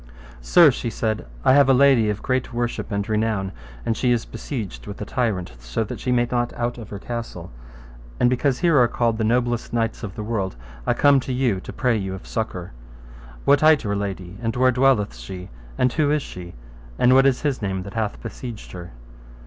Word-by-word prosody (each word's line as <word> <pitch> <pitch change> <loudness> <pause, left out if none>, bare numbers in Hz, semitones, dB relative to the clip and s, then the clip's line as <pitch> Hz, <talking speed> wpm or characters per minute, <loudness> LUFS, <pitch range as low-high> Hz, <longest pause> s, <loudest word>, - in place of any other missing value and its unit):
Sir, 165 - +6
she 120 -1 -3
said, 110 - -2 0.2
I - - +6
have 140 -1 +6
a 135 - +6
lady 130 -5 +5
of 105 0 -3
great 130 -1 -1
worship 120 -1 -3
and 100 0 -1
renown, 110 -3 0 0.3
and 115 - 0
she 125 +1 +1
is 120 -2 +1
besieged 110 - -6
with 100 - -7
a 105 - -4
tyrant, 100 - -1
so - - -2
that 105 - -6
she 125 - -2
may 120 -1 +2
not 120 -1 0
out 120 0 -3
of 110 - -9
her 100 - -6
castle; 115 -5 -6 0.7
and 125 - +4
because 125 +1 +1
here 170 -5 +3
are 120 - +5
called 115 -1 0
the - - +1
noblest 120 +1 0
knights 115 -1 -1
of 95 -4 -6
the 105 - -5
world, 105 -4 -2 0.3
I - - +2
come 145 -1 +5
to 130 - -5
you 125 -6 +1
to - - -8
pray 125 -3 +1
you 95 -2 -3
of 95 - -11
succour. 95 -6 -4 0.7
What 140 0 +5
hight 155 -2 +5
your 100 -2 -1
lady, 100 -1 -5
and 115 -1 -2
where 130 +1 +4
dwelleth 125 - +2
she, 90 +10 -8 0.3
and 125 -1 +2
who 155 -3 +2
is 150 -1 +1
she, 90 -4 -9 0.4
and 125 - +5
what 135 +1 +6
is 135 0 +1
his 140 -5 0
name 95 -2 -2
that 100 +1 -9
hath 110 -2 -2
besieged 115 -1 -7
her? 90 -4 -9
115 Hz, 215 wpm, -23 LUFS, 100-125 Hz, 0.7 s, Sir